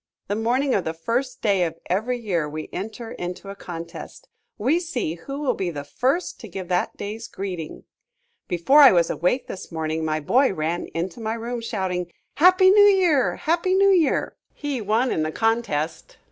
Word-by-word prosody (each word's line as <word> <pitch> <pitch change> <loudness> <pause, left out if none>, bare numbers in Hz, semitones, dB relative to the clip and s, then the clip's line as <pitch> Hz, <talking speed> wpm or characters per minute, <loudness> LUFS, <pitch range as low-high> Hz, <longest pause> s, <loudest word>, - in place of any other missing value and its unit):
The 205 - 0
morning 250 +5 +1
of 195 - +1
the 160 - -4
first 245 +9 -2
day 200 -4 +3
of 165 -1 -3
every 220 +8 -1
year 180 -10 -1
we 155 +1 -6
enter 220 +4 -6
into 180 +2 -6
a - - -9
contest. 170 -3 -9 0.3
We 265 +11 +2
see 295 - -3
who 275 +12 -7
will 295 -3 +1
be 185 -2 -2
the 145 -4 -5
first 265 - -1
to 225 - -9
give 190 -1 -7
that 180 0 0
day's 220 +3 -6
greeting. 180 -5 -6 0.6
Before 180 - +4
I 280 -3 +10
was 170 -2 +3
awake 180 - 0
this 185 - -8
morning 160 0 -2
my 155 0 0
boy 255 - +3
ran 165 +2 -2
into 170 +4 -3
my 220 0 -2
room 235 +1 -4
shouting, 185 -6 -3 0.3
"Happy 370 +3 +6
New 410 +1 +7
Year! 365 -9 +4
Happy 350 +2 +1
New 395 +1 +5
Year!" 340 -6 +2 0.2
He 285 -5 -3
won 220 +5 +1
in 160 - 0
the 155 0 -1
contest. 225 -8 -1
215 Hz, 185 wpm, -23 LUFS, 175-265 Hz, 0.6 s, I